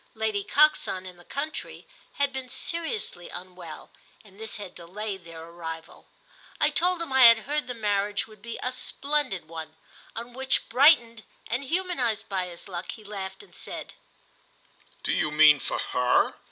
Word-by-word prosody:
Lady 220 -2 -1
Coxon, 285 -9 +3
in 180 -1 -10
the 175 - -16
country, 290 - -5 0.3
had 280 -1 0
been 260 -1 -5
seriously 335 - -1
unwell, 180 -2 -9 0.3
and 200 -1 -18
this 220 +1 -4
had 200 -4 -8
delayed 190 +2 -6
their 165 -1 -9
arrival. 165 -1 -8 0.5
I - - +4
told 355 0 +3
him 275 - -5
I 265 - +5
had 230 -1 +8
heard 295 -1 -1
the 250 - -4
marriage 205 -2 0
would 215 -1 -17
be 235 -1 -6
a 255 - 0
splendid 265 - -1
one; 160 -1 -8 0.4
on 235 +2 -6
which, 265 +1 0
brightened 240 -3 +5 0.2
and 250 +4 -2
humanised 270 - 0
by 185 -2 -1
his 170 -1 -10
luck, 180 -2 -5
he 220 - -12
laughed 195 - -6
and - - -19
said - - -5 1.1
"Do - - 0
you - - +1
mean 150 -1 +7
for - - -3
her?" 125 0 +2
215 Hz, 165 wpm, -27 LUFS, 180-265 Hz, 1.1 s, had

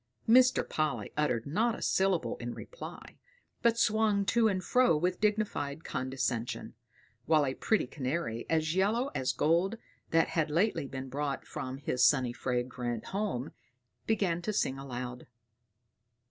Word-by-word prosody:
Mr. 250 +2 +5
Polly 155 -1 -1
uttered 135 -7 0
not 220 +10 +1
a - - -10
syllable 185 -10 +1
in 120 0 -5
reply, - - -10 0.4
but 235 -1 +3
swung 215 -3 +2
to 230 +2 +3
and 190 -3 0
fro 250 -6 +4
with 180 +3 0
dignified 205 -9 0
condescension; 130 -2 -3 0.5
while 155 -2 +4
a 130 - -1
pretty 220 +9 +1
canary, 130 -3 -3
as 160 0 +1
yellow 220 +9 +1
as 130 0 0
gold, 170 - +1 0.3
that 165 0 +3
had 160 -2 0
lately 165 -2 +1
been 135 0 -6
brought 140 +1 -3
from 130 +1 -5
his 130 -2 0
sunny 130 -4 +4
fragrant 120 -2 -2
home, 190 - -2 0.6
began 195 -6 +1
to 215 - -2
sing 135 -9 0
aloud. 125 -2 -6
155 Hz, 140 wpm, -31 LUFS, 130-205 Hz, 0.6 s, Mr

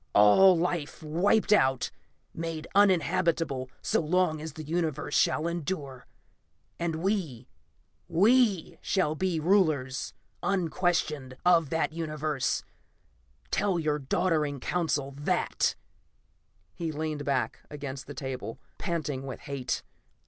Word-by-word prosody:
All 175 - +7
life 165 -3 -2
wiped 195 +8 +3
out; 130 -9 +2 0.4
made 165 -1 -4
uninhabitable 170 -8 +2
so - - +2
long 160 -1 +1
as 160 -1 -6
the 155 - -7
Universe 155 -2 -2
shall 155 - +3
endure. 150 -6 -4 0.7
And 165 -1 -2
we 165 - -1 0.6
we 205 0 +3
shall 185 -6 +1
be 175 0 -1
rulers, 155 -7 +1 0.3
unquestioned, 165 -7 0
of 170 -4 +5
that 160 -1 0
Universe. 155 -3 -1 0.9
Tell 195 -3 +1
your 150 -2 0
doddering 150 -1 0
Council 145 -3 -1
that!" 145 - 0 1.0
He 165 -2 -3
leaned 155 -1 -3
back 140 -2 -1
against 140 -3 -6
the 145 - -8
table, 130 -5 -5 0.2
panting 150 -7 -3
with 130 - -6
hate. 140 -3 -3
155 Hz, 110 wpm, -28 LUFS, 140-175 Hz, 1.0 s, All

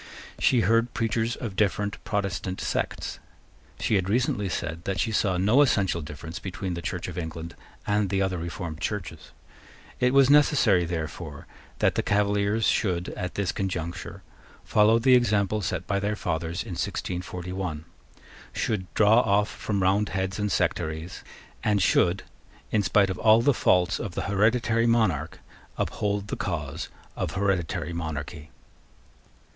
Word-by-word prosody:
She 125 -3 +4
heard 115 +2 +2
preachers 115 +1 0
of 110 -6 -6
different 100 0 0
Protestant 95 -2 -2
sects. - - -3 0.6
She - - 0
had 95 -2 +2
recently 105 -3 +1
said 85 -1 -4
that 95 -1 -2
she 115 - 0
saw 100 -4 +1
no 105 +10 +4
essential 95 -11 +2
difference 80 +3 -7
between 95 -1 -4
the 85 - -4
Church 90 0 -4
of 90 -1 -5
England 80 0 -6 0.3
and 105 -1 +1
the 95 0 0
other 95 -2 0
reformed 85 -1 -5
Churches. 85 -7 -4 0.7
It 125 0 +3
was 135 -1 +6
necessary, 135 - +4
therefore, 80 -2 -5 0.3
that - - +2
the - - 0
Cavaliers 105 +1 +1
should, 90 -3 +1
at 90 -1 -5
this 100 -4 0
conjuncture, 90 -4 -4 0.4
follow 110 +2 +4
the 130 +3 +4
example 105 -4 +3
set 90 -1 -2
by 100 -1 0
their 100 +2 -1
fathers 85 -2 -2
in - - -8
1641, 90 -2 -4 0.7
should 95 -5 -2
draw 110 +2 +6
off 105 -2 +2
from 100 -3 -2
Roundheads 95 0 0
and 105 0 -1
sectaries, 80 +2 -2 0.4
and 105 -1 +2
should, 90 +1 +3 0.5
in 110 - +3
spite 100 0 +3
of 90 - -5
all 110 +1 +5
the 145 - +4
faults 90 -4 +2
of 100 -7 -5
the - - -2
hereditary 115 +3 +2
monarch, 95 -10 +1 0.4
uphold 105 0 -2
the - - -2
cause 75 -7 -4 0.3
of - - -3
hereditary 95 -4 -1
monarchy. 80 -1 -5
95 Hz, 145 wpm, -26 LUFS, 85-105 Hz, 0.7 s, was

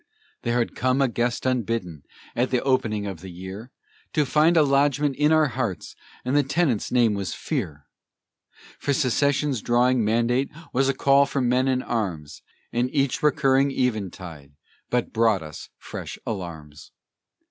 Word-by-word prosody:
There 120 +1 0
had 120 - 0
come 130 +1 +1
a 135 - +4
guest 120 +1 -2
unbidden, 115 - -1 0.3
at 125 +2 +1
the 125 - 0
opening 115 -6 0
of 95 -5 -6
the 95 - -9
year, 95 +7 -9 0.4
To 150 - +2
find 155 +5 +3
a 155 - +6
lodgment 140 0 +2
in 150 +3 +2
our 155 -2 +4
hearts, 115 -6 -4 0.3
and 130 +3 0
the 145 - +5
tenant's 140 - 0
name 120 -4 +3
was 100 -4 -3
fear; 90 - -4 0.9
For 145 - 0
secession's 140 -1 +1
drawing 120 0 +2
mandate 120 +5 +1 0.2
was 135 +1 +2
a 135 - 0
call 140 +1 +4
for 140 - -2
men 125 +1 +2
and 130 -1 +1
arms, 90 -11 -3 0.3
And 120 +2 +1
each 140 -3 0
recurring 140 -2 +3
eventide 95 - -3 0.4
but 125 -1 -1
brought 110 -6 +2
us 75 -1 -9
fresh - - -7
alarms. 80 -7 -7
125 Hz, 155 wpm, -24 LUFS, 105-135 Hz, 0.9 s, a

